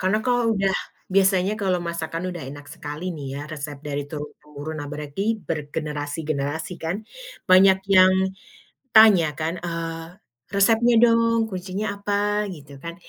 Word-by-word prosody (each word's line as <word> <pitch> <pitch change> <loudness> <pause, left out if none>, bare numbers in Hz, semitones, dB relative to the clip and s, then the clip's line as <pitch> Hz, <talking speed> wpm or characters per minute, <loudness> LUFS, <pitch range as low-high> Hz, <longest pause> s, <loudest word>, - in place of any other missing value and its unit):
karena 190 +3 +2
kalau 245 -1 +2
udah 195 -1 +1 0.4
biasanya 195 0 +3
kalau 185 -2 +1
masakan 165 0 -4
udah 175 -4 -7
enak 145 +1 -10
sekali 150 +3 -7
nih 145 -2 -7
ya, 140 - -5
resep 145 -1 -6
dari 145 0 -2
turun 150 0 -6
temurun. 150 +1 -8
Nah 145 - -6
berarti 150 +4 -4 0.3
bergenerasi-generasi 150 +1 -3
kan 165 +3 -1 0.5
banyak 190 +1 +7 0.2
yang 185 0 +8 0.8
tanya 215 -7 +8
kan, 160 +2 -1
eee, 165 -1 -3 0.6
"resepnya 225 +4 +4
dong, 230 -1 +4
kuncinya 190 +2 -4
apa?" 200 0 -2 0.4
gitu 145 -3 -14
kan. 170 0 -6
170 Hz, 140 wpm, -23 LUFS, 150-195 Hz, 0.8 s, yang